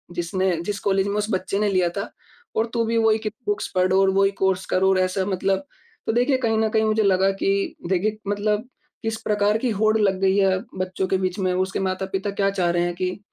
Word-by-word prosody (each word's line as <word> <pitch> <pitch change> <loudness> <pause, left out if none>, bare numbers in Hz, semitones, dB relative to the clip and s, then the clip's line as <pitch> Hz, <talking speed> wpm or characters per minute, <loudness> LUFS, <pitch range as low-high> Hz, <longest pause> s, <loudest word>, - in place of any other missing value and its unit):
जिसने 185 +1 0
जिस 205 +2 -3
कॉलेज 195 0 +1
में 200 - -2
उस 210 +1 -1
बच्चे 190 +1 -1
ने 210 -1 +2
लिया 185 -3 +2
था 200 - -3 0.5
और 220 - +2
तू 230 -1 +1
भी 230 +1 0
वही 220 -1 +4
कि 215 -1 -3 0.2
बुक्स 415 +1 -1
पढ़ 185 0 +2
और 195 0 +4
वही 195 +1 +3
कोर्स 190 -1 +1
कर 185 - +2
और 190 -1 +4
ऐसा।" 185 +1 0
मतलब, 195 +5 -1 0.4
तो 225 - +1
देखिए 255 +3 +2
कहीं 225 -3 0
न 220 0 +2
कहीं 220 0 +2
मुझे 215 0 +2
लगा 190 0 +3
कि 195 0 0
देखिए 210 +3 0
मतलब 210 +3 -1 0.3
किस 225 0 -2
प्रकार 210 0 +1
की 245 +1 -1
होड़ 215 0 +3
लग 195 -3 +1
गई 195 +1 +3
है 190 -1 +3 0.2
बच्चों 185 0 -2
के 190 - +1
बीच 185 +1 -2
में, 185 -1 +1
उसके 185 +2 -1
माता-पिता 190 +1 -2
क्या 195 0 +1
चाह 185 -3 0
रहे 175 0 +1
हैं 175 0 -1
कि, 185 +2 -3
195 Hz, 230 wpm, -23 LUFS, 185-215 Hz, 0.5 s, वही